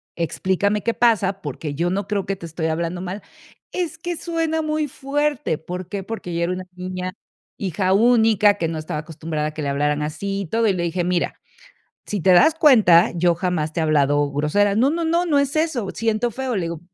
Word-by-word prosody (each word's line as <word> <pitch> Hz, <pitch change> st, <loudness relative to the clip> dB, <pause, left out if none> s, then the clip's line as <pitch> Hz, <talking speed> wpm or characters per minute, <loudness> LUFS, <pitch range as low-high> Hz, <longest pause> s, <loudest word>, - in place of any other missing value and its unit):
explícame 190 Hz, +5 st, 0 dB
qué 230 Hz, -, +1 dB
pasa, 205 Hz, -4 st, +2 dB
porque 145 Hz, +1 st, -5 dB
yo 170 Hz, +5 st, 0 dB
no 195 Hz, +2 st, -2 dB
creo 200 Hz, -2 st, -1 dB
que 195 Hz, -, -1 dB
te 175 Hz, -, -10 dB
estoy 160 Hz, 0 st, -3 dB
hablando 170 Hz, +2 st, -2 dB
mal". 190 Hz, +3 st, -5 dB, 0.5 s
"Es 335 Hz, -3 st, -3 dB
que 345 Hz, +1 st, -4 dB
suena 325 Hz, -2 st, -1 dB
muy 305 Hz, -1 st, -1 dB
fuerte", 290 Hz, -, -1 dB
¿por 180 Hz, +3 st, -7 dB
qué? 195 Hz, 0 st, -4 dB
Porque 225 Hz, -2 st, -6 dB
ella 170 Hz, 0 st, -1 dB
era 180 Hz, -, 0 dB
una 185 Hz, 0 st, -6 dB
niña, 185 Hz, 0 st, -5 dB, 0.5 s
hija 185 Hz, 0 st, -1 dB
única 220 Hz, -2 st, +5 dB
que 165 Hz, -, 0 dB
no 165 Hz, -, -4 dB
estaba 155 Hz, -1 st, -4 dB
acostumbrada 155 Hz, -1 st, -4 dB
a 155 Hz, -, -6 dB
que 155 Hz, -, -4 dB
le 140 Hz, -, -1 dB
hablaran 145 Hz, +1 st, 0 dB
así 195 Hz, +7 st, -3 dB
y -, -, -4 dB
todo, 225 Hz, +6 st, +1 dB
y 200 Hz, -, +3 dB
le 175 Hz, -2 st, -2 dB
dije: 175 Hz, +1 st, -1 dB
"Mira, 175 Hz, 0 st, -1 dB, 0.7 s
si 205 Hz, -, -3 dB
te 185 Hz, +3 st, +3 dB
das 180 Hz, -, +6 dB
cuenta, 220 Hz, -, +6 dB
yo 175 Hz, 0 st, +2 dB
jamás 165 Hz, -4 st, -1 dB
te 165 Hz, -, -1 dB
he -, -, +1 dB
hablado 145 Hz, -2 st, +2 dB
grosera". 175 Hz, +8 st, +2 dB
"No, 245 Hz, +6 st, +3 dB
no, 335 Hz, +2 st, -1 dB
no, 340 Hz, +2 st, +1 dB
no 300 Hz, -4 st, +3 dB
es 280 Hz, 0 st, 0 dB
eso, 300 Hz, -10 st, 0 dB
siento 225 Hz, +1 st, 0 dB
feo". 255 Hz, -1 st, -3 dB
Le 185 Hz, -, -1 dB
digo 165 Hz, -1 st, -4 dB
190 Hz, 215 wpm, -22 LUFS, 165-235 Hz, 0.7 s, das